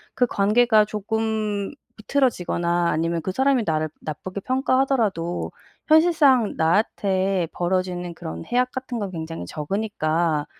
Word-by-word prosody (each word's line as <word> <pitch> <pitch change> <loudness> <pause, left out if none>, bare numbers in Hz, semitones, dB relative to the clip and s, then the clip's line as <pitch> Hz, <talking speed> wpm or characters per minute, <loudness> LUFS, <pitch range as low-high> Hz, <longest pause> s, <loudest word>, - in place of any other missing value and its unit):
그 250 - +3
관계가 215 +1 +3
조금 215 0 -2 0.3
비틀어지거나 175 -9 0
아니면 165 +1 0
그 185 - -3
사람이 265 +2 +2
나를 155 -1 0
나쁘게 185 +6 -6
평가하더라도 255 -9 0 0.4
현실상 305 -8 +4
나한테 190 +1 +1
벌어지는 180 -1 -2
그런 80 - -7
해악 250 +1 +1
같은 260 -2 -5
건 200 -2 -4
굉장히 160 - -6
적으니까 160 - -1
200 Hz, 305 characters per minute, -23 LUFS, 170-240 Hz, 0.4 s, 현실상